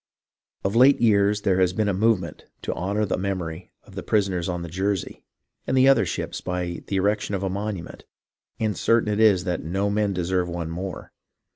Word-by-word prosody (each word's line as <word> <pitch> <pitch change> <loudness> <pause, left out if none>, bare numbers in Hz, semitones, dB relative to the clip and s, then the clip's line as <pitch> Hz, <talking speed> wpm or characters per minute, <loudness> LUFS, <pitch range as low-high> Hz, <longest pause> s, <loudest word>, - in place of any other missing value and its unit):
Of 100 +3 -1
late 130 +4 +6
years 105 -2 +3
there 95 -1 +2
has 90 -1 +3
been 105 +1 0
a 100 - +1
movement 95 -5 0 0.2
to - - -2
honour 100 +4 -1
the 95 - -2
memory 90 -3 -4
of - - -17
the - - -5
prisoners 95 -4 0
on 90 -1 -3
iheyersey 95 +2 -2 0.5
and 130 - +1
the 130 +1 +6
other 135 -4 +5
ships - - -4
by 90 -1 -3
the 100 - -2
erection 105 +1 0
of 95 - -3
a 95 - -1
monument, 100 -3 -5 0.5
and 110 -2 0
certain 110 +2 +2
it 105 - -2
is 105 -4 +4
no 95 +3 -1
men 105 -1 +1
deserve 90 -1 -1
one 85 -1 -4
more. 90 +2 -6
95 Hz, 185 wpm, -24 LUFS, 90-105 Hz, 0.5 s, late